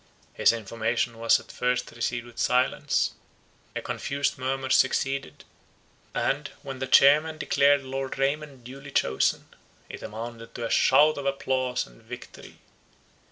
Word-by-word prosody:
His -, -, +4 dB
information 115 Hz, +1 st, -2 dB
was 115 Hz, 0 st, +4 dB
at -, -, -13 dB
first 125 Hz, 0 st, -1 dB
received 120 Hz, 0 st, -3 dB
with 120 Hz, -1 st, -12 dB
silence; 125 Hz, +1 st, +1 dB, 0.6 s
a -, -, -3 dB
confused 140 Hz, 0 st, -2 dB
murmur 130 Hz, 0 st, -2 dB
succeeded; 135 Hz, +1 st, +1 dB, 0.7 s
and, 140 Hz, +2 st, 0 dB, 0.2 s
when 135 Hz, -2 st, -7 dB
the 130 Hz, -, -3 dB
chairman 150 Hz, +4 st, +5 dB
declared 140 Hz, -2 st, +3 dB
Lord 135 Hz, 0 st, -4 dB
Raymond 140 Hz, -1 st, -2 dB
duly 135 Hz, +3 st, -10 dB
chosen, 65 Hz, -, +1 dB, 0.4 s
it -, -, -8 dB
amounted 115 Hz, +1 st, -8 dB
to 120 Hz, -, -4 dB
a -, -, -4 dB
shout 150 Hz, +3 st, +5 dB
of 140 Hz, -, -3 dB
applause 130 Hz, -2 st, -1 dB
and -, -, -19 dB
victory. -, -, -11 dB
130 Hz, 135 wpm, -26 LUFS, 120-140 Hz, 0.7 s, chairman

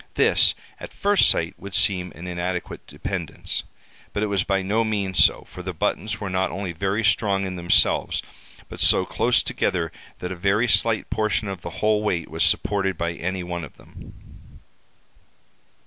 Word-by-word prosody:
This, -, -, +5 dB, 0.2 s
at -, -, -9 dB
first 205 Hz, 0 st, +4 dB
sight, 85 Hz, 0 st, +1 dB
would 100 Hz, -1 st, -7 dB
seem 90 Hz, -3 st, +1 dB
an 85 Hz, -, -9 dB
inadequate 90 Hz, 0 st, -4 dB
dependence; -, -, -4 dB, 0.5 s
but 105 Hz, -, -1 dB
it 105 Hz, -1 st, -1 dB
was 95 Hz, -3 st, +2 dB
by 95 Hz, -1 st, 0 dB
no 105 Hz, +4 st, +1 dB
means 100 Hz, -4 st, +2 dB
so, -, -, +3 dB
for 90 Hz, -, -11 dB
the 90 Hz, -1 st, -5 dB
buttons 110 Hz, +4 st, -1 dB
were 100 Hz, -, -4 dB
not 95 Hz, 0 st, 0 dB
only 95 Hz, 0 st, -4 dB
very 95 Hz, +6 st, -1 dB
strong 100 Hz, -2 st, +2 dB
in 95 Hz, -1 st, -4 dB
themselves, 85 Hz, -1 st, +2 dB, 0.4 s
but -, -, -10 dB
so -, -, +5 dB
close -, -, +2 dB
together 85 Hz, -2 st, -1 dB, 0.3 s
that 90 Hz, -, -5 dB
a -, -, -4 dB
very 100 Hz, +6 st, +1 dB
slight 115 Hz, -1 st, +1 dB
portion 110 Hz, -1 st, 0 dB
of 95 Hz, -3 st, -5 dB
the 85 Hz, -, -6 dB, 0.2 s
whole 105 Hz, -1 st, +3 dB
weight 90 Hz, -6 st, -2 dB
was -, -, 0 dB
supported 100 Hz, -3 st, +1 dB
by 85 Hz, +1 st, -1 dB
any 90 Hz, +2 st, -3 dB
one 85 Hz, -1 st, -4 dB
of 75 Hz, -, -11 dB
them. -, -, -16 dB
95 Hz, 175 wpm, -23 LUFS, 90-105 Hz, 0.5 s, This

